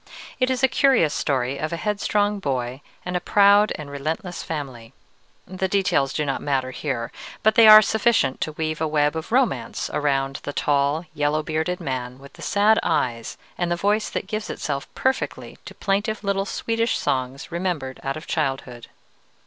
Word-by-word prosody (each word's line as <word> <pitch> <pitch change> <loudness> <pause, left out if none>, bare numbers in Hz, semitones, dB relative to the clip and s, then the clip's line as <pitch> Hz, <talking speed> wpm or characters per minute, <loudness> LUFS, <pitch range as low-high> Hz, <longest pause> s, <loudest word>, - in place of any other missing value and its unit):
It 255 0 +2
is 260 0 -1
a - - +7
curious 250 - +3
story 130 -1 -1
of 155 - -3
a 170 - -2
headstrong 205 +1 0
boy 130 -5 -3 0.2
and 180 0 -3
a - - +2
proud 205 +2 +5
and 150 -2 -8
relentless 160 +6 -4
family: 130 -7 -6 0.5
the 190 0 -3
details 185 -8 +1
do 150 - -1
not 135 -1 -2
matter 135 -3 -1
here, 125 -4 -3 0.3
but 220 - +5
they 225 0 +7
are 215 0 +11
sufficient 220 - +1
to 155 - -2
weave 155 0 -3
a 160 - +1
web 150 0 +1
of 160 +6 -5
romance 255 0 0
around 135 -2 0
the 145 - -5
tall 145 +4 +1
yellow 150 0 0
bearded 160 +3 -2
man 130 -5 -4
with 140 +1 -15
the - - -14
sad 210 +2 +3
eyes 115 -2 -1 0.2
and 175 -1 0
the - - +2
voice 205 +4 0
that - - -4
gives 215 +2 -4
itself 140 -2 -4
perfectly 260 0 -2
to - - -10
plaintive 205 +2 -1
little 195 -1 0
Swedish 230 +2 -1
songs 130 +3 -2
remembered 170 -7 -3
out 135 +1 -3
of 155 - -9
childhood. 135 -5 -3
155 Hz, 175 wpm, -23 LUFS, 135-205 Hz, 0.5 s, are